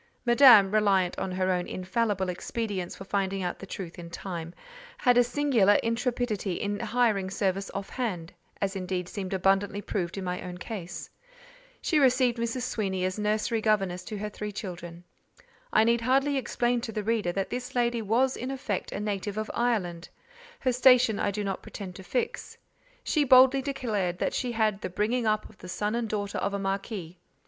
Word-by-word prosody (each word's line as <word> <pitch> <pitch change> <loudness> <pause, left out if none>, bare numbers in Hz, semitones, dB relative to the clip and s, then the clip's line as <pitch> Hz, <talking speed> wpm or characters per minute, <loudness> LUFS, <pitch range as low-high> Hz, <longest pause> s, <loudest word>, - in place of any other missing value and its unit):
Madame—reliant 210 -7 +6
on 190 - -2
her 185 0 0
own 180 -1 -1
infallible 190 +1 -1
expedients 190 0 -3
for - - -9
finding 195 -1 -1
out 180 - -3
the 195 - -9
truth 180 -3 -7
in 170 -1 -8
time—had 245 - -3
a 245 - +6
singular 240 -6 +3
intrepidity 230 -4 -1
in 205 +3 -2
hiring 220 -6 +1
service 195 0 -1
off 195 0 -3
hand 185 -9 -3 0.3
(as 195 0 -1
indeed 185 -1 -3
seemed 190 -1 -5
abundantly 195 +2 +1
proved 185 -3 -3
in 195 - -3
my 180 0 -3
own 180 -1 -7
case). 180 -4 -6 0.8
She 315 - +2
received 255 -3 +3
Mrs. 235 +2 -2
Sweeny 190 -6 -1
as 185 +3 -2
nursery 215 +2 0
governess 195 -5 +1
to 215 - -5
her 210 +1 -3
three 210 0 -5
children. 175 -4 -7 0.7
I 215 - +5
need 235 +1 +3
hardly 270 +4 +2
explain 245 -2 0
to 230 - -5
the 215 -1 -3
reader 220 -4 0
that 195 0 -2
this 250 0 -5
lady 240 -1 +1
was 240 +5 +2
in 255 - -5
effect 240 -8 -3
a - - -4
native 205 0 -3
of 215 0 -2
Ireland; 190 -8 -1 0.5
her 255 -2 +1
station 250 -3 +5
I - - +1
do 205 +1 -3
not 195 -1 -3
pretend 190 -3 -8
to 190 - -10
fix: 240 +7 -3 0.5
she 305 - +2
boldly 265 0 +7
declared 220 -10 -2
that - - -1
she 245 -2 -2
had 220 -2 +2
"had 195 - -15
the - - -3
bringing 220 +6 0
up 215 0 +1
of 210 - -20
the 180 - -10
son 210 +4 -1
and 235 -1 -1
daughter 205 -1 -2
of 200 0 -1
a - - -2
marquis." 195 -3 -4
210 Hz, 185 wpm, -28 LUFS, 190-240 Hz, 0.8 s, boldly